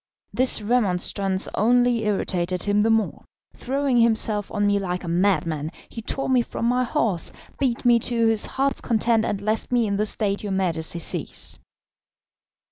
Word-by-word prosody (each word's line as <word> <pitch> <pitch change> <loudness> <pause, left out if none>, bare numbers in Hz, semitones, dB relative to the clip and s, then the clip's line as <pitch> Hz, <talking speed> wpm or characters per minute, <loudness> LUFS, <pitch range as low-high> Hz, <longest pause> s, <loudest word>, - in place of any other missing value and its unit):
This 255 -4 +2
remonstrance 195 -3 0
only 240 +1 +2
irritated 185 -3 -1
him 205 0 +1
the 220 - +2
more. 225 -1 0 0.3
Throwing 270 0 -1
himself 220 -3 +2
on 205 -1 0
me 205 0 +2
like 180 -2 -4
a - - -7
madman, 165 -4 0 0.2
he 230 - -8
tore 270 +4 -2
me 255 -2 +3
from 230 - -5
my 250 +1 +2
horse, 210 -7 -1 0.3
beat 250 -3 -1
me 240 -1 +5
to 230 0 0
his 225 -1 +3
heart's 275 +1 0
content, 230 -1 +1
and 205 -1 -3
left 215 +3 -2
me 240 -2 +2
in 200 -1 -1
the 210 +1 0
state 205 -2 -1
your 205 -2 -4
Majesty 170 -3 0
sees." 170 - -1
215 Hz, 165 wpm, -23 LUFS, 195-235 Hz, 0.3 s, me